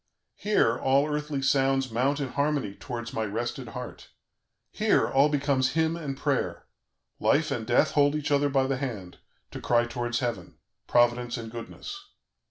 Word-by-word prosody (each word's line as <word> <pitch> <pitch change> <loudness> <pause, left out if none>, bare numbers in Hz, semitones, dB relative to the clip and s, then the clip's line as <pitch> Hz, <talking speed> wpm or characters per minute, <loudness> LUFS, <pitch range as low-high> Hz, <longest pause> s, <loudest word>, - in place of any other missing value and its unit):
"Here, 200 - +2
all 135 +2 +3
earthly 150 -2 -2
sounds 135 -1 +2
mount 135 +5 +1
in 140 -2 -2
harmony 140 -8 -1
towards 120 +1 -6
my 110 - -1
rested 120 +4 -3
heart; 125 +2 -8 0.6
here, - - +2
all 140 +2 +4
becomes 140 -3 +1
hymn 160 0 +1
and 145 -5 -5
prayer; 140 -2 -1 0.5
Life 150 0 +2
and 115 -5 -3
Death 120 - +3
hold 145 0 +3
each 150 0 -2
other 145 0 +3
by 135 -1 +2
the 135 0 -1
hand, 110 -10 -6 0.3
to - - -7
cry 120 0 +2
towards 120 0 -2
heaven: 120 -2 -3 0.3
Providence 120 0 +2
and 115 -1 -7
Goodness. 395 - -8
135 Hz, 160 wpm, -27 LUFS, 120-145 Hz, 0.6 s, all